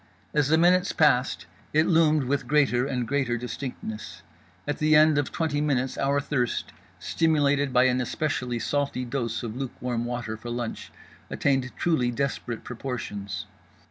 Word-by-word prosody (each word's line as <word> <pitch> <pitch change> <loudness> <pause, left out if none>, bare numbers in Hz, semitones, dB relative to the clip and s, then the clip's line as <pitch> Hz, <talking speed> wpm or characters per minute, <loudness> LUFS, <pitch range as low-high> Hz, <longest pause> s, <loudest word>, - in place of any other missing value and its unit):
As 150 -2 +2
the 160 +2 +4
minutes 180 +3 +4
passed, 130 -5 +2 0.3
it 155 +1 +4
loomed 155 -4 +4
with 135 +2 -1
greater 135 -4 +3
and 125 -4 -2
greater 135 -4 0
distinctness. 120 -3 -6 0.4
At 145 - -2
the 155 0 +4
end 155 -1 +6
of 145 - -2
twenty 155 -3 -1
minutes 135 -3 0
our 140 +1 +1
thirst—stimulated 145 +2 0
by 125 0 +5
an 130 0 +2
especially 125 -2 -2
salty 140 0 -1
dose 120 -2 -3
of 115 -1 -5
lukewarm 125 -2 -3
water 120 -2 -4
for 120 +2 -8
lunch—attained 125 +2 -3
truly 155 -8 +1
desperate 120 -2 -3
proportions. 105 -6 -5
135 Hz, 140 wpm, -26 LUFS, 120-150 Hz, 0.4 s, end